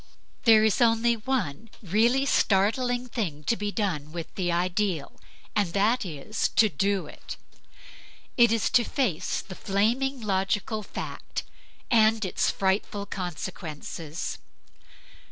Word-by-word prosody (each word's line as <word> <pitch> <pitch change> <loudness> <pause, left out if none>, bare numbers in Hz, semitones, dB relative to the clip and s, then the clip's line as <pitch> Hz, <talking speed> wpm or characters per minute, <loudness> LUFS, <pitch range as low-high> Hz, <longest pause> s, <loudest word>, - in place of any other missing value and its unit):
There 220 -2 +7
is 220 +2 +2
only 235 0 +4
one 225 - -2
really 230 +8 +3
startling 245 +3 +2
thing 175 -11 -3
to 230 - +1
be 205 -2 -3
done 175 -9 -2
with 165 -1 -6
the 180 -2 -1
ideal, 180 -2 0 0.4
and 200 -5 +1
that 220 +5 +2
is 165 +6 -2
to 220 - +5
do 195 +4 0
it. - - -9 1.0
It 235 -2 +5
is 225 -2 +1
to 240 - +5
face 230 - -1
the 190 0 -10
flaming 235 +9 0
logical 205 +1 -1
fact, - - -6 0.5
and 220 -2 +4
its 185 - +1
frightful 200 +1 0
consequences. 170 -3 -5
205 Hz, 120 wpm, -27 LUFS, 180-230 Hz, 1.0 s, There